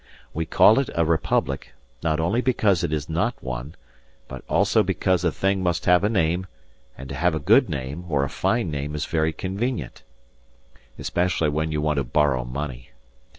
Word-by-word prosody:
We 80 0 -3
call 110 - +6
it 135 - -1
a 85 - +2
republic, 75 -4 -1 0.3
not 80 -1 0
only 90 +10 +1
because 105 -8 +2
it 85 - -1
is 75 -2 -2
not 85 +10 0
one, 65 +4 -6 0.5
but 65 -1 -9
also - - +3
because 95 -1 0
a 85 - +2
thing 95 +2 0
must 90 -3 -1
have 90 +1 +4
a 105 - +2
name; 90 -3 0 0.5
and 65 - -8
to - - -5
have 85 +4 +1
a - - -1
good 110 - +4
name, 70 +3 -5
or 70 -3 +1
a - - 0
fine 90 - -1
name, 75 0 -4
is 75 - -2
very 80 -1 0
convenient 100 - -4 1.0
especially 85 -3 0
when 80 +2 -1
you 75 -1 -1
want 75 -1 0
to 70 - +1
borrow 65 0 +1
money. 65 -1 -6
80 Hz, 185 wpm, -24 LUFS, 70-95 Hz, 1.0 s, call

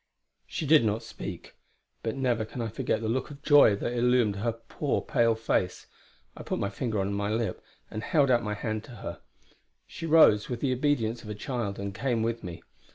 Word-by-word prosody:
She 160 - -4
did 150 -2 +6
not 110 +1 0
speak; - - -8 0.5
but 110 - -2
never 125 -4 +1
can 110 +3 -8
I 115 -1 -2
forget 110 0 -1
the 110 - -2
look 125 +3 -1
of 145 0 -12
joy 145 -8 +7
that 120 - -3
illumined 120 -4 +2
her 115 +4 0
poor, 115 +5 -2
pale 115 -3 +2
face. 110 -5 -1 0.5
I - - -9
put - - -3
my 100 - -2
finger 110 0 -2
on 100 +1 -1
my 100 0 -1
lip, 110 +1 -2 0.3
and 110 - -4
held 140 +2 +3
out 120 -1 +4
my 105 -1 -3
hand 110 0 -3
to 120 - -11
her. - - -6 0.6
She 165 - -7
rose, 150 -10 +6
with 120 -2 -3
the 130 0 +1
obedience 120 -4 0
of 105 - -10
a 105 - -4
child, 105 -2 -3
and 100 0 -4
came 115 0 0
with 115 0 -2
me. 85 -2 -7
115 Hz, 210 wpm, -28 LUFS, 105-125 Hz, 0.6 s, joy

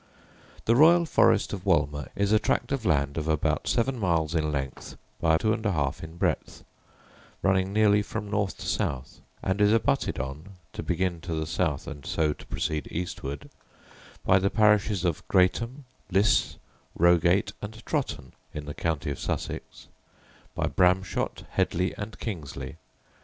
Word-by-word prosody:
The 115 - +4
royal 170 +5 +6
forest - - +3
of - - -5
Wolmer 75 -1 +1
is 100 +1 +1
a 110 - +5
tract 110 - 0
of 135 -5 -2
land 70 -3 +1
of 75 - -4
about 80 -2 0
seven 125 +1 +1
miles 85 -5 +1
in 75 -2 0
length, 70 -2 -5 0.2
by 80 -1 +4
two 110 +5 +1
and 110 0 -4
a 100 -3 +1
half 70 -3 -1
in 80 +1 -9
breadth, 90 -4 -2 0.8
running 95 0 +2
nearly 105 0 +4
from 105 0 -5
north 100 -1 -1
to - - -8
south, 65 -3 -2 0.2
and 95 +2 0
is 105 0 +5
abutted 115 0 +1
on, 70 +9 -6 0.2
to - - -5
begin 90 -3 -1
to 85 -1 -4
the 80 0 -2
south, 80 -3 -1
and 75 -4 -8
so 75 +1 0
to - - -15
proceed 75 -1 -2
eastward, 70 -5 -5 0.7
by 95 - +5
the 100 +1 +1
parishes 105 -3 +3
of 85 -3 0
Greatham, 115 +9 +2 0.3
Lysse, 100 +4 +3 0.4
Rogate, 85 +3 +4
and 110 +2 -8
Trotton, 125 - -2 0.2
in 75 -1 -5
the 75 - -5
county 80 -2 -2
of 70 - -5
Sussex; - - -5 0.7
by - - 0
Bramshot, 90 +1 +1
Hedleigh, 90 +2 0
and 105 +1 -6
Kingsley. 85 -11 -6
90 Hz, 160 wpm, -27 LUFS, 80-105 Hz, 0.8 s, royal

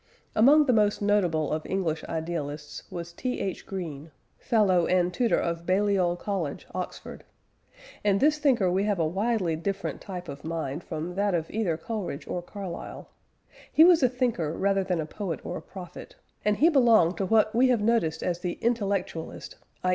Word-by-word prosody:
Among 290 +7 +6
the 255 - +3
most 210 -2 +3
notable 180 -7 +1
of 155 0 -2
English 170 -5 -1
idealists 155 -3 -5
was 170 -1 -7
T. 250 +8 -3
H. 190 -2 -4
Green 160 -6 -6 0.3
fellow 190 -7 +3
and 180 -1 +2
tutor 235 +5 +2
of 170 0 -2
Balliol 190 -2 +2
College, 175 -6 -3
Oxford. 185 -1 -6 0.8
In 200 -2 +3
this 300 +5 +3
thinker 245 -11 +3
we 190 +3 +1
have 205 -2 +1
a 165 - +1
widely 190 0 0
different 195 +4 -3
type 180 -3 -7
of 140 -1 -8
mind 160 -1 -4
from 165 +2 -5
that 200 0 +1
of 165 -1 -3
either 195 -7 0
Coleridge 185 -5 -5
or 180 - -3
Carlyle. 185 -1 -8 0.6
He 315 - +7
was 340 -2 +6
a 255 - +4
thinker 235 - -1
rather 195 0 +2
than 180 -2 -1
a 155 - -1
poet 175 0 -5
or 180 - -4
a - - -7
prophet, 180 -3 -10 0.3
and 210 0 +2
he 315 - +5
belonged 230 - +4
to 195 - 0
what 215 +1 +3
we 250 +3 +4
have 245 -4 +2
noticed 190 -9 +1
as 175 -1 -1
the 175 -1 -2
intellectualist 200 -8 -2 0.3
i. 185 - +1
185 Hz, 175 wpm, -27 LUFS, 170-215 Hz, 0.8 s, He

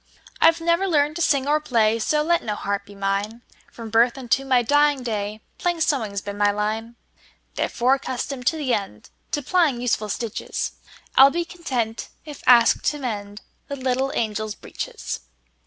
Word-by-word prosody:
I 325 - +8
've 330 +1 -1
never 340 +3 +1
learned 300 -3 +2
to - - -3
sing 280 -4 +2
or 300 +1 +3
play, 230 -6 +2
So 300 +7 +1
let 340 +2 +2
no 210 -2 -3
harp 200 0 -3
be 205 - -13
mine; 200 +4 -2 0.3
From 225 -2 -9
birth 235 +3 +3
unto 265 +1 0
my 255 -2 +3
dying 290 +1 +3
day, 215 -2 -3 0.2
Plain 350 -2 0
sewing 245 -10 0
's 200 - -1
been 205 0 -7
my 205 0 +4
line. 215 +3 -2 0.6
Therefore, 250 +2 +1
accustomed 260 -1 -3
to 320 - +2
the 285 -5 -2
endTo 205 - -4
plying 325 -9 +2
useful 225 -3 -1
stitches,I 230 +4 -1
'll - - +6
be 340 +4 -2
content 255 -10 -3 0.2
if 295 -3 -9
asked 240 -2 +6
to 295 - +1
mendThe 205 -6 -5 0.4
little 260 +1 0
angels' 215 -1 -2
breeches. - - -6
245 Hz, 170 wpm, -23 LUFS, 215-290 Hz, 0.6 s, I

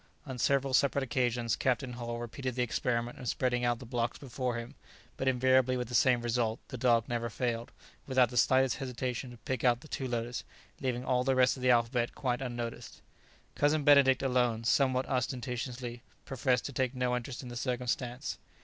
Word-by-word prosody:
On 130 -3 -6
several 135 +1 +2
separate 140 +1 +3
occasions 120 -4 0
Captain 130 0 0
Hull 120 -1 -4
repeated 120 +2 -4
the 125 - +1
experiment 120 0 -1
of 125 - -6
spreading 125 -1 0
out 120 -1 +2
the 125 - -10
blocks 120 0 -2
before 125 -2 -3
him, 115 0 -6 0.4
but 135 - -3
invariably 130 0 +3
with 125 -2 -3
the - - -7
same 120 0 +4
result; 115 -1 0
the - - -6
dog 120 -2 +2
never 120 -1 -2
failed, 115 0 -2 0.4
without 130 -3 +4
the 125 - -4
slightest 130 +1 +4
hesitation, 125 -1 -3
to 120 - -11
pick 130 +1 -4
out 120 -1 +3
the - - -13
two 135 -3 -3
letters, 120 0 -3 0.4
leaving 125 -2 -2
all 125 -1 +2
the 135 0 +2
rest 130 0 +4
of 130 - -9
the 125 - +2
alphabet 120 0 +2
quite 125 -2 -1
unnoticed. 120 -2 -5 0.5
Cousin 145 +1 +2
Benedict 140 -2 +6
alone, 125 -3 +1
somewhat 130 +1 +2
ostentatiously, 125 -1 -3 0.2
professed 130 -1 0
to 140 - -5
take 130 0 -1
no 125 -1 0
interest 125 +2 -5
in 125 - -8
the 120 - -7
circumstance. 125 +2 -2
125 Hz, 185 wpm, -31 LUFS, 120-130 Hz, 0.5 s, Benedict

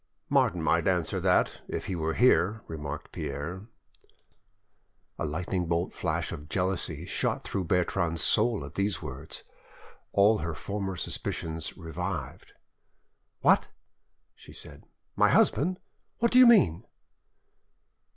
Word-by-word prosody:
"Martin 85 -2 +2
might 85 +1 +2
answer 90 -4 +1
that, - - +2
if - - -4
he 95 - -3
were 80 -1 -1
here," 110 -3 +3
remarked 75 -2 -6
Pierre. 85 +9 -5 1.5
A - - -1
lightning 90 +3 -2 0.2
flash - - -2
of 75 +2 -8
jealousy 90 -4 -2
shot - - -1
through 95 -2 -3
Bertrande's 85 -2 +1
soul 110 -6 +3
at 70 - -10
these 100 -1 -1
words, 70 +1 -7 0.7
all 105 +2 +4
her 80 0 -3
former 100 -2 -4
suspicions 80 -1 -4
revived. 85 -3 -5 0.9
"What!" - - +4 0.7
she - - -15
said, - - -10 0.3
"my - - +4
husband! 180 +6 +3 0.4
What 235 0 +2
do 255 - +6
you 255 - +9
mean?" 195 - +5
90 Hz, 120 wpm, -28 LUFS, 80-100 Hz, 1.5 s, you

